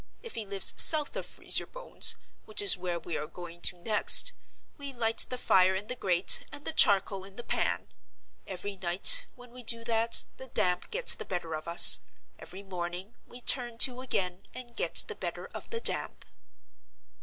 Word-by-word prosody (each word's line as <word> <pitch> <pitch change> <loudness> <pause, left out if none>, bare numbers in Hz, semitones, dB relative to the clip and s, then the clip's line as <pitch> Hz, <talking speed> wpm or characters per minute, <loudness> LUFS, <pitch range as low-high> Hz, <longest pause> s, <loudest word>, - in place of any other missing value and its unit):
If 465 - -13
he 220 -3 -9
lives 195 -1 +4
South 305 -2 +5
of - - -8
Freeze - - -3
your - - -13
Bones—which - - -6
is 200 -2 +3
where 175 -1 -8
we 170 - -9
are 150 - -9
going 175 0 -15
to 180 - -1
next—we 275 - +1
light 225 -2 +2
the 250 - -7
fire 190 -5 -1
in 195 +2 -8
the 250 - -7
grate 185 -5 +2
and 290 0 -13
the - - -6
charcoal 195 -6 0
in 195 0 -17
the 240 - -12
pan. - - -5 0.6
Every 195 +1 -10
night, 190 - +1
when 245 -1 -19
we 250 +1 -13
do 230 0 -2
that, 230 0 +1
the 260 - -13
damp 180 -6 -4
gets - - +3
the - - -10
better 175 -3 -9
of 155 +1 -10
us: 170 +1 +9 0.4
every 190 +2 -13
morning, 180 +2 -10
we 245 - -13
turn 240 -2 -2
to 255 -1 -10
again, 185 -8 -7
and 240 -2 -13
get - - +3
the - - -9
better - - -9
of - - -12
the 460 - -7
damp." - - -3
205 Hz, 185 wpm, -25 LUFS, 180-250 Hz, 0.6 s, us